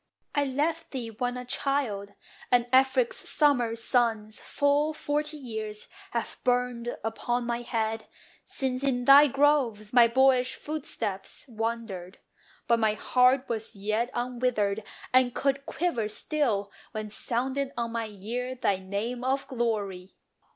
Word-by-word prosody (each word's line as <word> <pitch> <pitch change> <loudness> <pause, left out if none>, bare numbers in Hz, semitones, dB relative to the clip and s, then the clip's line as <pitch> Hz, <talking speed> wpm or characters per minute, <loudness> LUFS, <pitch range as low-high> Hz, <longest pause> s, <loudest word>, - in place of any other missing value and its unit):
I 290 -1 +2
left 310 +5 -1
thee 240 -4 -5
when 245 +3 -2
a 250 - -6
child; 245 -7 -1 0.4
And 245 -1 +4
Afric's 270 - +4
summer 250 -7 +2
suns 230 -2 0
full 290 +2 +1
forty 300 0 -2
years 220 -5 -6 0.2
Have 235 -1 -3
burned 245 -1 0
upon 240 +2 -1
my 235 0 -2
head, 225 -2 -2 0.4
since 260 -2 -3
in 245 -3 0
thy 280 +2 +9
groves 265 -7 +2
My 240 -1 +8
boyish 255 +1 +3
footsteps 230 -10 -5
wandered. 225 -6 -4 0.5
But 235 -1 +4
my 215 -1 +2
heart 255 +3 +3
Was 225 -1 -4
yet 215 +4 -1
unwithered, 240 -4 0 0.3
and 255 -1 +4
could 275 0 0
quiver 275 -11 -1
still 215 -4 -1 0.2
When 215 -1 -5
sounded 260 +5 -2
on 235 -1 -1
my 230 -1 -2
ear 235 +5 -4
thy 200 -6 +1
name 205 +6 -4
of 270 +2 0
glory. 205 -7 -2
240 Hz, 130 wpm, -28 LUFS, 220-265 Hz, 0.5 s, thy